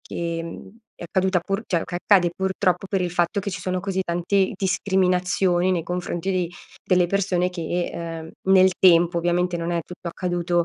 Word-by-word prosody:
che, 170 -1 -4
mhmm, 165 +3 -9 0.3
è - - -8
accaduta 190 +1 +1
pur 195 +5 -3
cioè, 170 -3 0
che - - -8
accade, 180 -1 +3
purtroppo, 190 -1 0
per 195 -1 0
il 180 -1 -1
fatto 175 +2 +1
che 200 - -4
ci 190 - -5
sono 185 0 -2
così 190 0 -2
tanti 185 +3 0
discriminazioni 185 -1 +1
nei 175 -2 0
confronti 180 +1 -3
di 180 -2 -1 0.3
delle 180 -1 +3
persone 180 -1 +1
che, 175 0 -3 0.5
uhm, 190 - +2
nel 190 0 +6
tempo. 170 -1 +5
Ovviamente, 175 +1 0
non 170 0 -3
è 170 - 0
tutto 180 -1 -8
accaduto, 175 -1 -1
180 Hz, 180 wpm, -23 LUFS, 175-190 Hz, 0.5 s, nel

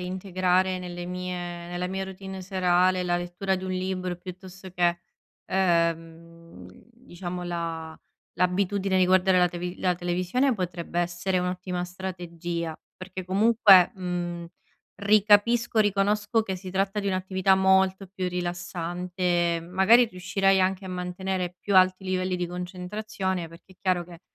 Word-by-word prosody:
integrare 185 0 0
nelle 175 -1 -6
mie 180 0 -4 0.3
nella 175 +1 -3
mia 190 +1 -3
routine 190 0 -8
serale 185 -1 +2
la 175 -1 0
lettura 175 +2 -2
di 185 - -6
un 185 - -3
libro, 185 -1 -2
piuttosto 185 +1 -10
che, 175 -1 +1 0.4
ehm, 170 - -1 0.3
diciamo 180 -7 -7
la 165 -2 -4 0.4
l'abitudine 190 +2 +1
di 185 - +5
guardare 185 0 +4
la 180 0 +4
teve 180 +1 -5
la 180 -1 +1
televisione 180 +10 0
potrebbe 175 -3 -4
essere 175 +2 -1
un'ottima 180 0 -3
strategia, 175 -2 -5 0.2
perché 185 -1 -8
comunque, 200 -2 +6
mhmm, 175 -2 -4 0.6
ri 210 +1 +5
capisco, 230 +3 +4
riconosco 205 +2 +2
che 190 -3 -4
si 185 0 -8
tratta 195 +2 0
di 200 - -4
un'attività 190 0 +2
molto 190 0 +3
più 185 -1 -4
rilassante, 175 0 -1
mhmm, 165 - -12
magari 230 +6 +6
riuscirei 190 0 +1
a 190 +1 +2
mantenere 180 0 -3
più 200 +1 +1
alti 185 +1 +4
i - - -7
livelli 185 0 -1
di 175 - -2
concentrazione, 185 +1 -4
perché 170 +3 -16
è - - -24
chiaro 185 -2 +1
che, 170 -1 -13
185 Hz, 140 wpm, -26 LUFS, 175-190 Hz, 0.6 s, comunque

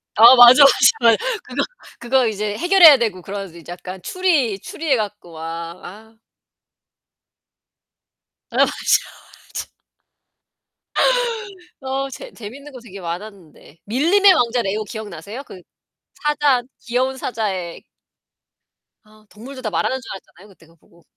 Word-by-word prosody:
아 235 +4 +8
맞아, 245 +3 +9
맞아, 275 - +8 0.3
맞아. 230 -1 +5 0.3
그거 - - -2 0.4
그거 250 +1 +1
이제 210 -1 -3
해결해야 350 -4 +7
되고 215 -7 -2
그런 195 +1 -7
이제 170 - -13
약간 185 +1 -9
추리 285 - 0
추리해 305 +3 -2
갖고 210 -5 -6
막 160 - -10 0.4
아. 220 +4 -13 2.4
아 - - -10
맞아, - - +6
맞아. - - -3 2.1
어. 270 +1 -3
재 - - -10
재밌는 265 +7 -11
거 255 - -10
되게 200 -4 -12
많았는데. 175 -3 -9
밀림의 345 - +4
왕자 245 -6 +1
레오 210 +1 -2
기억나세요? 210 - -8
그 185 - -13 0.5
사자 295 -4 +1 0.2
귀여운 255 +2 -2
사자의 195 -9 -4 1.2
아 215 0 -23
동물도 255 +5 -11
다 220 - -3
말하는 260 - -1
줄 230 - -10
알았잖아요, 195 0 -13
그때 180 -4 -21
그거 165 - -24
보고. 170 +1 -26
225 Hz, 260 characters per minute, -19 LUFS, 195-265 Hz, 2.4 s, 맞아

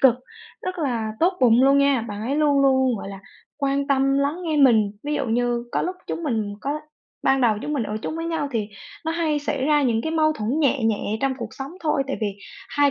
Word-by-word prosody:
cực, 260 -4 +6 0.5
rất 370 -1 -4
là 235 -7 -1
tốt 355 +3 +4
bụng 245 0 +5
luôn 275 +1 +5
nha, 280 -3 +3
bạn 205 +1 -5
ấy 275 +5 -1
luôn 290 -2 +3
luôn, 260 -3 +3
gọi 195 - -7
là, 195 -1 -8 0.4
quan 280 0 0
tâm, 275 0 +2
lắng 285 +4 0
nghe 315 -2 0
mình. 225 -7 +5
Ví 295 +1 -2
dụ 280 -2 -1
như 240 +1 0
có - - +1
lúc 365 +1 -3
chúng 335 - -4
mình 220 -8 -1
có 295 +2 -2 0.4
ban 270 0 +3
đầu 225 -4 +3
chúng 300 - -3
mình 275 - 0
ở 215 0 -3
chung 315 - -3
với 330 - -3
nhau 325 -4 -1
thì 220 -5 -2 0.4
nó 320 - -1
hay 320 -3 0
xảy 280 -2 -2
ra 295 0 +3
những 235 -4 +2
cái 320 - -2
mâu 310 -1 +3
thuẫn 220 -6 -3
nhẹ 275 -3 +2
nhẹ 215 -1 0
trong 270 -1 +1
cuộc 235 -3 -4
sống 270 +1 -7
thôi, 300 -4 +1
tại 270 - -2
vì 215 - +1 0.4
2 285 0 +3
275 Hz, 240 wpm, -23 LUFS, 235-295 Hz, 0.5 s, cực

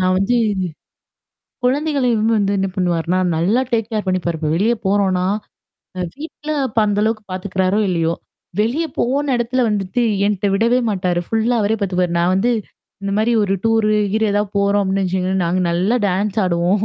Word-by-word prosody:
நான் 185 0 +2
வந்து 195 +6 +1 1.3
குழந்தைகளையும் 250 -5 +1
வந்து 200 -1 +1
என்ன 195 0 0
பண்ணுவாருன்னா 175 0 0 0.2
நல்லா 195 +10 +2
டேக்கேர் 225 -2 -1
பண்ணிப்பாரு, 175 -3 -1
இப்ப 155 -2 -1
வெளிய 220 +7 +2
போறோம்னா, 190 -2 +2 0.7
அ - - -2
வீட்ல 305 +1 -8 0.2
அப்ப 225 -1 -4
அந்த 205 0 0
அளவுக்கு 220 -1 -1
பார்த்துக்கிறாரோ 185 +1 0
இல்லயோ! 165 -2 0 0.5
வெளிய 255 +10 +1
போன 275 +3 +1
இடத்துல 240 +2 0
வந்துட்டு 200 +1 -1 0.3
என்ட்ட 205 -1 0
விடவே 230 +5 +3
மாட்டாரு. 180 -3 0
ஃபுல்லா 225 +2 +1
அவரே 215 +2 +1
பாத்தபாரு. 180 -3 0
நான் 175 +2 +2
வந்து, 215 +6 +2 0.5
இந்த 200 0 -2
மாரி 225 +2 +2
ஒரு 195 - 0
டூர்ரு 225 -1 +3 0.2
ஹீர்னு 220 -1 +1
ஏதாவது 205 0 -1
போறோம் 200 +1 +2
அப்டின்னு 195 0 0
வச்சுோங்களேன். 185 0 0
நாங்க 180 +2 0
நல்லா 190 +8 +1
டான்ஸ் 200 +3 -1
ஆடுவோம். 180 +4 +1
200 Hz, 155 wpm, -19 LUFS, 185-225 Hz, 1.3 s, விடவே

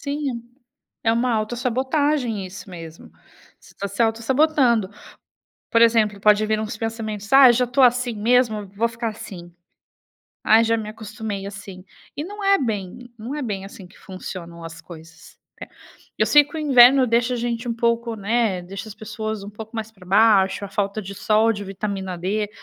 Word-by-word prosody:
Sim, 280 -4 -3 0.6
é 225 - +2
uma 240 +1 +1
autossabotagem, 250 +1 -1
isso 190 +1 -11
mesmo. 165 -2 -11 0.5
Você - - -20
tá 200 - -4
se 200 +4 -1
autossabotando. 235 -1 +2 0.8
Por 230 - +4
exemplo, 220 -3 +3
pode 210 +1 +4
vir 215 0 0
uns 215 -1 -5
pensamentos: 220 -2 -5
"Ah, 270 -2 +9
eu - - +5
já 250 +1 +1
tô 250 +3 +1
assim 245 -1 +3
mesmo, 220 -2 +1
vou 230 +3 +1
ficar 230 0 -4
assim, 175 -5 -10 0.9
ah, 220 +1 +5
já 230 0 +1
me 215 -1 -5
acostumei 215 -2 -6
assim". 200 -2 -9 0.3
E 295 - -4
não 410 +3 -8
é 395 0 +4
bem 225 0 -4
não 240 +7 -6
é 300 - -4
bem 200 -5 -4
assim 195 -2 -12
que 190 - -20
funcionam 170 -3 -9
as 165 0 -9
coisas. 165 -1 -14 0.6
É, - - -27 0.2
eu - - +2
sei 295 0 +6
que 295 +3 -13
o - - -3
inverno 260 -2 +6
deixa 235 +2 +1
a - - -3
gente 235 0 -3
um 235 - -1
pouco, 235 0 0
né, 210 -2 0
deixa 195 +4 -8
as 215 - -10
pessoas 215 -1 -5
um 205 - -8
pouco 220 +2 -10
mais 220 0 -5
pra 190 -4 -18
baixo, 200 0 +3
a - - -10
falta 200 +1 -2
de 200 0 -8
sol, 215 +3 +2
de 205 - -6
vitamina 195 -2 -5
D 205 +4 -2
220 Hz, 185 wpm, -22 LUFS, 200-240 Hz, 0.9 s, Ah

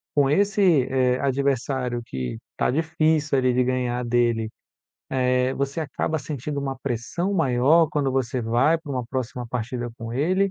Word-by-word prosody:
com 140 -2 +4
esse, 195 -3 +3
eh, 130 -1 +2
adversário 130 -2 0
que 65 - -4 0.2
tá - - +1
difícil 155 -1 +1
ali 130 -1 +2
de 125 +1 +3
ganhar 125 -1 -1
dele, 120 -2 +1 0.8
eh, 125 0 +2
você 140 +3 -2
acaba 155 +2 -2
sentindo 140 +1 -4
uma 135 -1 -4
pressão 135 - -2
maior 155 0 +4
quando 140 -3 0
você 130 -1 -1
vai 120 +9 +3
pra 150 -3 -7
uma 125 -2 -2
próxima 125 -1 -4
partida 120 +1 -3
com 115 0 -6
ele, 185 +9 +1
130 Hz, 155 wpm, -24 LUFS, 125-150 Hz, 0.8 s, com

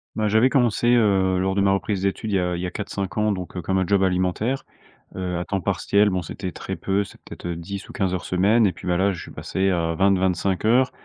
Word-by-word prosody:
Bah, 110 -1 0
j'avais 110 +5 +4
commencé, 120 -2 +3
heu, 95 -5 +3
lors 95 +1 0
de 100 - +1
ma 100 0 +3
reprise 100 0 -1
d'études 100 +2 -2
il - - +1
y - - +3
a 90 -1 -1
il 85 - -4
y - - -2
a - - -2
4-5 100 -2 -5
ans 105 0 +2
donc, 90 -1 -5
heu, 90 - -3
comme 95 +3 -1
un 95 - +1
job 100 0 +2
alimentaire, 95 +8 0 0.5
heu, 90 -2 -3
à 90 - -3
temps 100 -2 -2
partiel 100 +4 +2
bon 95 -1 -1
c'était 95 +2 -6
très 95 - -6
peu, 95 +4 0
c'est 90 - -14
peut-être - - -9
10 90 +4 -6
ou - - -10
15 95 -2 -1
heures 90 - -3
semaine 105 +5 +3
et 95 - +3
puis, 90 - -10
bah, 90 -1 +2
là 100 +2 +2
je 85 - -6
suis - - -10
passé 95 +1 -1
à 85 -2 0
20-25 95 0 +1
heures, 125 +3 +4
95 Hz, 260 wpm, -23 LUFS, 90-105 Hz, 0.5 s, j'avais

